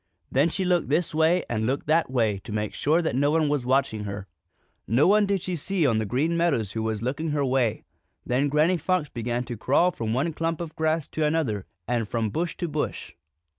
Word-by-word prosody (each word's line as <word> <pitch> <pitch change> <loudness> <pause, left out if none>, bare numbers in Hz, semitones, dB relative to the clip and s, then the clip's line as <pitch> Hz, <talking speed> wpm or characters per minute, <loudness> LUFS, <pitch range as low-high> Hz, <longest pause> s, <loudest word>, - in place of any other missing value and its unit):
Then 140 +5 +3
she 190 +3 -2
looked 180 -4 +1
this 155 +3 +1
way 160 +3 +3
and 110 -1 -1
looked 135 +2 -1
that 160 -1 +2
way 110 -6 +1
to 110 - -10
make 105 0 -2
sure 160 +4 +2
that 160 - -1
no 140 +2 +3
one 155 -1 +2
was 145 -4 -1
watching 130 -5 +1
her. 100 -1 -5 0.6
No 125 +6 +3
one 205 +1 +4
did 195 -3 0
she 185 - -2
see 175 +1 -1
on 115 -5 +2
the 110 - -2
Green 150 +9 0
Meadows 145 - +1
who 110 - -3
was 110 -1 -2
looking 145 +6 -2
her 145 -1 0
way. 125 -4 +1 0.4
Then 135 +4 +1
Granny 155 +5 +3
Fox 170 -2 0
began 120 +1 -2
to 120 -1 -6
crawl 145 - +3
from 115 -8 -4
one 140 +8 0
clump 165 +1 -2
of 170 -2 -6
grass 160 -1 0
to 160 - -2
another 150 -11 0 0.2
and 115 -3 -1
from 115 -3 -1
bush 170 - -2
to 175 - -2
bush. 150 -1 -3
145 Hz, 220 wpm, -25 LUFS, 120-165 Hz, 0.6 s, one